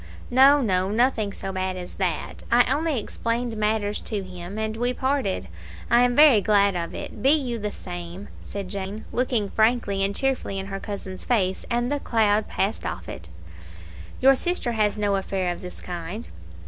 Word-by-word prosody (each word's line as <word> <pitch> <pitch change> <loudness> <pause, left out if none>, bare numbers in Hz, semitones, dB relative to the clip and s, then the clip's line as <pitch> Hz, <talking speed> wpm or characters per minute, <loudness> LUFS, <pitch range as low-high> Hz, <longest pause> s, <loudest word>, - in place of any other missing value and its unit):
"No, 275 +3 +7
no; 190 -5 +1
nothing 220 -1 +2
so 195 -1 -6
bad 185 0 -2
as 180 -1 -7
that. 185 -3 -2
I 240 +1 +6
only 305 -2 0
explained 230 +2 -2
matters 210 -1 0
to 205 -3 -3
him, 180 +1 -8
and 220 0 -2
we 245 +2 0
parted. 260 -6 -1 0.4
I 235 +1 +6
am 245 0 +3
very 290 -7 +7
glad 200 -1 +3
of 170 -1 -3
it. - - -7
Be 265 - +4
you 265 -6 +1
the 210 0 -3
same," 175 +1 -7
said 200 -2 -6
Jane, 200 +2 -5
looking 240 -5 0
frankly 220 -3 +2
and 200 +1 0
cheerfully 265 -7 -1
in 190 - -3
her 195 - -3
cousin's 195 -2 -7
face, 190 -6 0
and 240 +2 0
the 290 - 0
cloud 215 -4 +2
passed 200 +3 -1
off - - -5
it. 85 - -8 0.9
"Your 270 +1 +7
sister 310 -2 0
has 215 -2 +1
no 205 -1 +1
affair 190 -2 -1
of - - -11
this 180 -1 -9
kind?" 180 +5 -6
210 Hz, 180 wpm, -25 LUFS, 195-245 Hz, 0.9 s, No